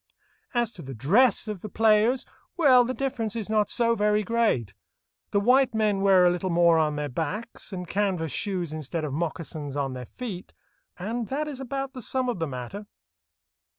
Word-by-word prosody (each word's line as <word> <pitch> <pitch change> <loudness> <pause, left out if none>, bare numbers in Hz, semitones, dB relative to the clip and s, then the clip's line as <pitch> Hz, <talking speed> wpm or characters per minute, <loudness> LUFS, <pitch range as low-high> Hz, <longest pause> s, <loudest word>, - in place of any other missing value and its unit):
As 240 -2 +1
to 180 - -10
the 135 -3 -8
dress 205 - +3
of 210 -4 -5
the 215 - -6
players—well, 245 - +3
the 255 - -2
difference 235 -6 -2
is 220 -2 -3
not 215 -1 +2
so 235 -1 +2
very 210 -1 +2
great. 210 - 0 0.6
The 200 - +2
white 250 +3 +3
men 210 -3 +1
wear 190 -2 +5
a 175 - +5
little 180 +1 -2
more 170 -1 +4
on 155 -1 +1
their 150 0 -2
backs, 175 - -4
and 180 -2 -5
canvas 185 -5 -1
shoes 180 - -2
instead 155 +1 -4
of 140 - -4
moccasins 155 -2 -4
on 140 -2 -1
their 125 -2 -7
feet, 210 -8 -7 0.4
and 225 +5 -3
that 300 +3 -2
is 280 -3 -6
about 270 +1 -4
the 255 - -7
sum 255 +2 -1
of 235 - -2
the 165 - -1
matter. 140 - -7
205 Hz, 185 wpm, -26 LUFS, 165-235 Hz, 0.6 s, wear